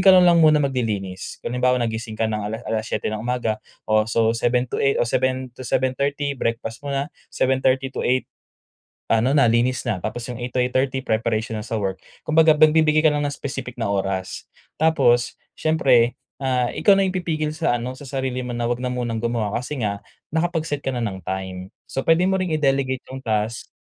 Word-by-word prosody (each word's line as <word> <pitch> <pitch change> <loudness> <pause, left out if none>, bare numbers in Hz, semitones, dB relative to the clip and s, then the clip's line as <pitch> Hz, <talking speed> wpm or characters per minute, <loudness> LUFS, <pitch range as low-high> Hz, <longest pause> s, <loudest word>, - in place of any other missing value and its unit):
ka 190 - +5
na 185 - +7
lang 170 -1 +6
muna 155 -2 +5
mag-lilinis, 105 -8 -2
kung 120 - -4
halimbawa 125 0 +2
nagising 110 0 -3
ka 115 - 0
ng 105 -1 -2
ala 110 - -3
7:00 110 -1 -2
ng 110 - -3
umaga 120 -2 -1 0.2
o 110 0 +2
so 115 0 +2
7:00 120 +2 +1
to - - -2
8:00 140 0 +2
o - - +3
7:00 130 +1 0
to - - -15
7:30 140 +3 0
breakfast 115 -2 -3
muna, 140 +2 -2 0.2
7:30 130 0 +1
to - - -5
8:00, 130 +1 +1 0.8
ano 115 +4 +3
na 140 -4 +5
linis 120 +3 +1
na 105 -5 0
tapos 115 +2 -4
yung 120 -1 -6
8:00 125 - -3
to 130 - 0
8:30 130 +1 +1
preparation 110 0 0
na 110 - -3
sa 115 - -2
work. 95 -2 -3 0.2
Kumbaga 160 0 +5
nagbibigay 155 0 +5
ka 155 - +5
lang 145 0 0
ng 145 - 0
specific 130 -3 -6
na 115 - -1
oras, 95 -1 -2 0.4
tapos, 130 -7 +3 0.2
siyempre 130 -6 +3 0.2
ah, 125 -2 +1
ikaw 200 -2 +4
na 195 - +3
yung 185 - -2
pipigil 155 -4 -1
sa 155 -7 +1
ano, 125 +2 -5
sa 130 - -12
sarili 130 -2 -2
mo 125 - -5
na 120 0 -2
wag 120 +1 -1
na 125 - -1
munang 120 -2 -2
gumawa 115 -3 -1
kasi 130 +4 -3
nga, 100 0 -3 0.3
nakapag-set 160 -3 -1
ka - - -1
na 125 - -3
ng 95 -5 -3
time. 95 0 -5 0.2
So 135 - -3
pwede 165 +2 +3
mo 190 0 +2
ring 180 - -2
i-delegate 135 -3 0
yung 130 0 -7
task. 110 0 -2
125 Hz, 200 wpm, -22 LUFS, 115-140 Hz, 0.8 s, na